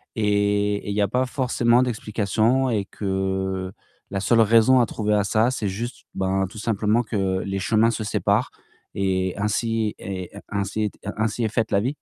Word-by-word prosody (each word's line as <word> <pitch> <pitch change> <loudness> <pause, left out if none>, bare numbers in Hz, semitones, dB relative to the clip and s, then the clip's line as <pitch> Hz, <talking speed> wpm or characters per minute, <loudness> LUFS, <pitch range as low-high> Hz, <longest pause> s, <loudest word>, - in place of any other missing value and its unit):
et 105 -1 +1
et - - -5
il 100 - -2
y 105 - +2
a 100 - +3
pas 125 +5 +1
forcément 125 -2 +2
d'explications 115 +2 0
et 105 -4 0
que 95 -1 -2 0.4
la 100 - -1
seule 115 +4 +3
raison 115 +4 +5
à 120 - +4
trouver 105 -1 -1
à 105 - +2
ça, 110 +4 +2
c'est 110 -5 -2
juste, 115 +6 -5
ben, 95 0 0
tout 110 - -12
simplement 110 +1 +1
que 95 -4 -1
les 95 0 -2
chemins 110 +3 +3
se 110 -1 -3
séparent 105 - +1 0.5
et 95 -1 0
ainsi 110 +1 0
et 95 -2 -5 0.2
ainsi 105 +1 -1
t - - -26 0.2
ainsi 110 +2 -1
est - - +2
faite 115 0 -1
la 100 - +3
vie. 125 +6 0
105 Hz, 185 wpm, -23 LUFS, 100-115 Hz, 0.5 s, raison